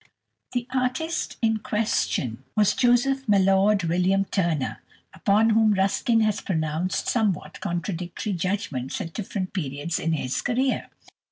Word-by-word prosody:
The 245 -1 -1
artist 260 +6 -1
in 220 -1 +3
question 145 - -1
was 210 -1 +4
Joseph 265 +2 +2
Mallord 195 0 +4
William 180 +4 +2
Turner, 170 -8 -1 0.3
upon 215 +3 +3
whom 220 -1 +4
Ruskin 200 +4 +2
has 215 -2 +1
pronounced 160 +1 -1
somewhat 210 -8 0
contradictory 175 +3 -3
judgments 175 - -2
at 165 - -5
different 190 -3 -4
periods 155 -2 -3
in 165 - 0
his 130 -4 -1
career. 255 +2 0
195 Hz, 120 wpm, -25 LUFS, 170-220 Hz, 0.3 s, was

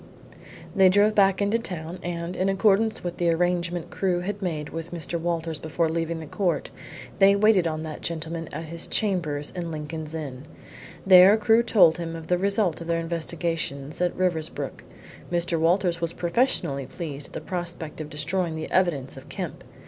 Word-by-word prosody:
They 190 -2 +6
drove 205 +3 +4
back 195 -2 +4
to 205 +3 +1
town, 175 -4 -5
and, 170 0 -4
in 190 +1 +1
accordance 210 +2 +2
with 175 -1 -4
the 175 -1 +1
arrangement 175 0 0
Crewe 180 -2 0
had 200 +3 -4
made 155 -5 -3
with 165 +1 -6
Mr. 170 0 -3
Walters 165 -2 -2
before 160 +1 -1
leaving 165 0 -2
the 160 - -7
court, 180 +2 -1 0.5
they 195 0 +7
waited 200 -4 +4
on 155 -1 -3
that 155 -1 -7
gentleman 165 0 -4
at 165 - -5
his 165 +1 -4
chambers 160 -8 0
in 175 -2 -4
Lincoln's 155 0 -5
Inn. 140 -3 -6 0.6
There 190 +2 +8
Crewe 225 +1 +4
told 195 -8 +4
him 165 -1 -4
of 165 -1 -7
the 180 +1 +1
result 200 -3 +1
of 165 - -7
their 170 0 +1
investigations 165 -3 -2
at 180 -1 0
Riversbrook. 170 -4 -2 0.5
Mr. 170 -1 0
Walters 170 +1 +2
was 170 0 0
professionally 170 - 0
pleased 145 -2 -6
at - - -19
the - - -4
prospect 175 -4 -5
of 150 - -7
destroying 165 +3 -1
the 160 - -5
evidence 160 -8 +1
of - - -12
Kemp. - - -6
170 Hz, 175 wpm, -25 LUFS, 160-185 Hz, 0.6 s, There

